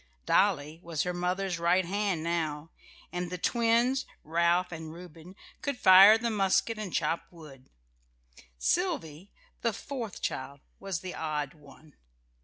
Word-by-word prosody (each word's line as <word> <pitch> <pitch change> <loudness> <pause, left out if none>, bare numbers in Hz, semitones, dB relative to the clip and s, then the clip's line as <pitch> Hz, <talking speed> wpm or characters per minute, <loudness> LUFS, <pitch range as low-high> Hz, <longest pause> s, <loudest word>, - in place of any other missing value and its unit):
Dolly 160 -6 +2
was 165 -3 -2
her 180 - -2
mother's 180 0 -2
right 175 +2 +2
hand 195 -3 -1
now; 165 -2 -2 0.4
and 180 0 -3
the 180 - -4
twins, 235 +6 +1 0.2
Ralph 170 +3 +1
and 160 -1 -7
Reuben, 170 +1 -12 0.3
could 280 -3 -2
fire 195 +1 +8
the 230 +1 -2
musket 210 +2 +1
and 205 -4 -5
chop 165 - -1
wood. 145 -6 -14 0.9
Sylvy, 195 - -1 0.3
the 230 -2 0
fourth 240 -4 -6
child, 140 +1 -4 0.2
was 195 -4 -4
the 185 -1 -6
odd 150 -3 -3
one. 150 0 -18
180 Hz, 135 wpm, -29 LUFS, 160-200 Hz, 0.9 s, fire